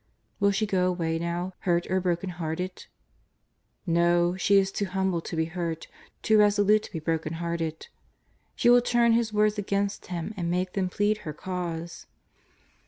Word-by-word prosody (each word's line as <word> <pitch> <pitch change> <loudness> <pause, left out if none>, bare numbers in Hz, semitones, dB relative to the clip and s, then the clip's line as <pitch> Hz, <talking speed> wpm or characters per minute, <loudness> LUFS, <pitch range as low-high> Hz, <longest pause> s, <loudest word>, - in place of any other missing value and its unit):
Will 200 -1 +4
she 200 +2 +1
go 185 -3 +1
away 165 -3 -1
now, 175 +2 -3
hurt 175 -1 +1
or 190 0 +2
brokenhearted? 175 0 -3 1.0
Xo, 175 +1 +2
she 200 +1 +4
is 195 0 +2
too 200 - -2
humble 190 -2 -1
to 165 - -6
be 160 0 +1
hurt, 165 -1 -4 0.4
too 220 -1 +4
resolute 210 0 +4
to - - -11
be 175 - -4
brokenhearted. 165 0 -3 0.7
She 240 - +4
will 245 0 +7
turn 240 -1 +3
His 230 -1 +1
words 210 0 +2
against 200 0 -2
Him 175 +3 -4
and 175 -3 -2
make 180 +1 -1
them 190 -2 0
plead 205 +3 0
her 155 -6 -6
cause. 170 0 -5
180 Hz, 160 wpm, -27 LUFS, 170-200 Hz, 1.0 s, will